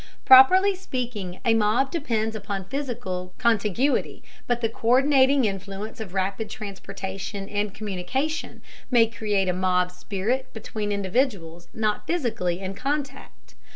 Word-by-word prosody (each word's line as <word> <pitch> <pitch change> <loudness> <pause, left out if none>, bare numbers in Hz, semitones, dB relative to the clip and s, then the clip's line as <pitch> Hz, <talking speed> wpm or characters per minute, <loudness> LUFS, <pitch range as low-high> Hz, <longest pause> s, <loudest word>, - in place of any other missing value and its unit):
Properly 370 +10 +8
speaking 240 - -5
a 230 - +4
mob 225 +5 +2
depends 225 -9 -1
upon 200 -2 -4
physical 220 -9 -4
contiguity, 235 +3 +1 0.2
but 245 -1 0
the 225 - +2
co÷rdinating 265 +3 +3
influence 200 +3 -5
of 195 -4 -7
rapid 195 +3 -1
transportation 195 -1 -6
and 205 0 -2
communication 215 - -3 0.3
may 235 -3 +5
create 210 -3 -1
a 180 - +1
mob 180 0 +1
spirit 210 +8 -3
between 215 -2 -4
individuals 195 -5 -1
not 215 -1 -1
physically 225 - -1
in 190 0 -4
contact. 275 +4 -5
215 Hz, 120 wpm, -25 LUFS, 195-255 Hz, 0.3 s, Properly